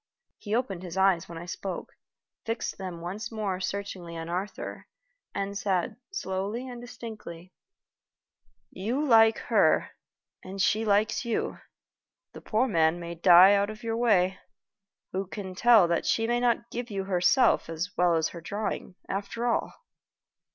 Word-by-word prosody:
He 210 0 -2
opened 215 -8 -2
his 180 0 -7
eyes 190 -2 +3
when 170 - -7
I 170 - -7
spoke, 180 0 -5 0.5
fixed 225 -2 -3
them 180 -3 -6
once 205 +8 -5
more 205 -4 -2
searchingly 185 -3 -5
on 165 0 -6
Arthur, 185 +4 -5 0.5
and 200 0 -3
said, 190 -3 -1 0.2
slowly 205 - -3
and 245 -1 -8
distinctly: 215 -8 -9 1.2
"You 240 +10 -2
like 225 -4 +6
her, - - +2 0.5
and 195 +1 -8
she 215 +3 +2
likes 210 +1 +2
you. 235 -2 -2 0.7
The - - -10
poor 230 +4 +1
man 165 -5 +2
may 170 0 -6
die 180 +3 +7
out 200 0 +2
of 215 +1 -9
your 225 -1 -1
way. 195 -6 +2 0.7
Who 190 +1 -3
can 190 -1 -6
tell 220 -1 +6
that 170 - 0
she 225 - +2
may 240 +1 +1
not 235 -1 0
give 245 0 -4
you 195 -2 -3
herself 190 +3 +3
as 170 +5 -4
well 175 -1 +3
as 160 -1 +1
her 170 - -9
drawing, 200 +1 -4
after 200 +4 -3
all?" 235 - 0
195 Hz, 150 wpm, -28 LUFS, 180-225 Hz, 1.2 s, die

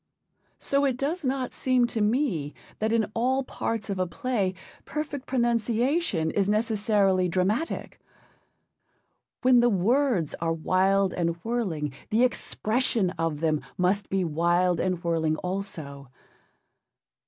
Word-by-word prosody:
So 280 0 +1
it 265 -3 +1
does 305 +6 -2
not 260 -1 -1
seem 255 -2 +2
to 235 -2 -2
me 210 - 0 0.2
that 220 +1 0
in 225 -2 +1
all 260 +3 +1
parts 225 -4 -3
of 195 -2 -3
a 185 - +1
play 195 0 -1 0.3
perfect 290 -2 -5
pronunciation 235 - +1
is 200 -1 +1
necessarily 205 -4 +2
dramatic. 195 - -1 1.4
When 250 -1 +6
the 240 0 +4
words 220 - +1
are 165 -1 +1
'wild 190 +4 +2
and 170 -1 0
whirling,' 180 - -2 0.2
the 225 +3 +3
expression 230 -4 0
of 165 -4 -2
them 155 -2 +1 0.2
must 190 +3 +1
be 190 -1 +1
wild 175 +2 +2
and 185 -1 -1
whirling 160 -2 +1
also. 160 -7 -5
200 Hz, 125 wpm, -26 LUFS, 175-245 Hz, 1.4 s, When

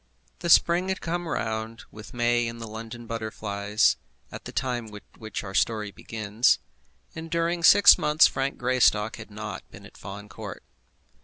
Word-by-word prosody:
The 170 - -3
spring 175 +3 +4
had 190 - -1
come 175 +1 -3
round, 110 -4 -3
with 105 0 -11
May 120 0 +1
and 115 0 -7
the 115 - -6
London 115 +2 -8
butterflies, 110 -2 0 0.3
at - - -9
the - - -7
time 125 -3 -2
at 105 - -10 0.2
which 110 -3 -6
our 95 -1 -8
story 105 0 0
begins, 110 +2 0 0.6
and 160 +1 -8
during 170 +1 0
six 200 +4 +8
months 150 +1 +5
Frank 135 +1 -1
Greystock 120 -4 +2
had 115 -1 -10
not 105 0 -6
been - - -13
at - - -15
Fawn 100 +1 -9
Court. 100 -1 -9
115 Hz, 165 wpm, -26 LUFS, 105-135 Hz, 0.6 s, six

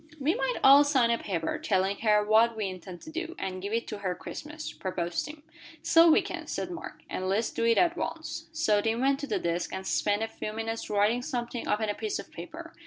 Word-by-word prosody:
"We 290 +4 +2
might 265 -2 -1
all 275 +2 +9
sign 265 -5 +3
a 235 - +1
paper, 165 -5 -2
telling 195 0 +1
her 210 -2 +3
what 225 +2 +4
we 215 - -1
intend 185 -1 -8
to 315 - -9
do, 335 +1 -4
and 185 -1 -4
give 200 +2 -4
it 230 +1 0
to 210 - -5
her 185 -3 -2
Christmas," 305 - -7
proposed 175 -2 -2
Tim. 300 0 -9 0.4
"So 330 +1 +6
we 315 - +5
can," - - -6
said 360 - -3
Mark, 345 - -8
"and 185 0 -3
let's 215 +4 +1
do 230 - -1
it 230 -1 +4
at 345 -1 +4
once." - - -4
So 310 -11 +2
Tim 225 +2 0
went 275 +1 +2
to 285 - -4
the - - 0
desk, 170 +1 -2
and 190 - -5
spent 205 +2 +1
a - - -1
few 215 -1 -6
minutes 225 +1 -4
writing 210 +4 +2
something 240 -2 -4
upon 215 0 0
a - - +1
piece 425 - -3
of - - -9
paper. - - -9
225 Hz, 235 wpm, -28 LUFS, 200-275 Hz, 0.4 s, all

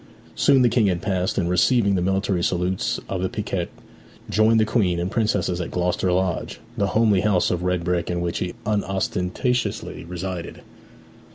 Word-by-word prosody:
Soon 135 -3 +4
the - - +5
King 115 -4 +3
had 90 -3 -1
passed, 95 -2 -1
and 90 -4 +1
receiving 100 +4 +3
the 95 - +1
military 95 -1 0
salutes 90 +1 0
of 95 -2 -3
the 95 - 0
piquet, 105 -6 -3 0.6
joined 110 +3 +4
the 110 - +4
Queen 95 -7 +1
and 90 +2 -2
princesses 100 -6 0
at 85 - -4
Gloucester 90 +1 0
Lodge, 90 -1 -1 0.2
the 100 -4 +1
homely 105 -4 +4
house 100 -4 +2
of 90 - -1
red 90 -1 0
brick 90 -1 -1
in 90 0 -1
which 85 -1 -2
he 90 - -3
unostentatiously 100 +3 -1
resided. 90 0 -6
95 Hz, 170 wpm, -23 LUFS, 90-105 Hz, 0.6 s, the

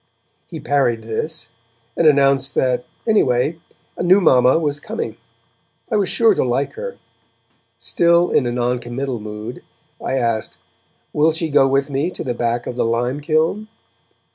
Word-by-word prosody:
He 165 - -7
parried 135 -6 0
this, 115 +3 -4 0.5
and 165 - +3
announced 140 -2 +3
that, 125 -1 +1 0.2
anyway, 160 - +2 0.4
a - - -5
new 185 +3 +5
mamma 130 -7 +4
was 145 -3 -1
coming; 225 +9 -5 0.8
I - - +1
was 200 -3 +1
sure 225 -2 +4
to - - 0
like 130 +3 -1
her. 485 0 -7 0.8
Still 170 0 +2
in 125 - +2
a - - -1
noncommittal 125 +1 -2
mood, 105 +3 -7 0.4
I - - -1
asked: 115 -4 -1 0.6
'Will 155 +2 +3
she 160 0 -2
go 135 -1 +5
with 135 +1 0
me 140 +5 0
to - - -7
the 125 - -2
back 120 0 -1
of 125 - -5
the - - +1
lime 120 +4 -1
kiln?' 160 +8 0
135 Hz, 155 wpm, -19 LUFS, 120-160 Hz, 0.8 s, new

